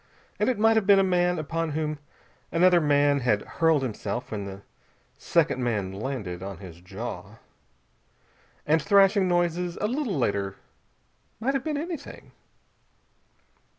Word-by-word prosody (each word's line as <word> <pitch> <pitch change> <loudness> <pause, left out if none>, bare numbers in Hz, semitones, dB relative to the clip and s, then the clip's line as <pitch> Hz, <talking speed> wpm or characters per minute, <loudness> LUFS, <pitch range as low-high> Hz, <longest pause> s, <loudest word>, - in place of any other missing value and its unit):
And - - +2
it 250 - 0
might 225 +1 +4
have 205 -3 +1
been 200 -1 +7
a 195 - +5
man 180 -1 +2
upon 165 +1 -2
whom 155 -1 -2 0.5
another 175 +1 +4
man 145 -1 +3
had 115 -5 +1
hurled 160 -4 +1
himself, 120 0 -4
when 105 -2 -4
the 100 0 -9 0.6
second 130 - +1
man 105 -6 -1
landed 100 -5 -5
on 95 -1 -6
his 90 -3 -12
jaw. 100 +1 -7 1.3
And 160 +1 +3
thrashing 200 0 +4
noises 175 0 0
a - - -2
little 245 - -2
later 100 -5 -1 0.8
might 255 +5 0
have 270 -2 -1
been 305 -2 -2
anything. 320 -1 -7
155 Hz, 140 wpm, -26 LUFS, -, 1.3 s, been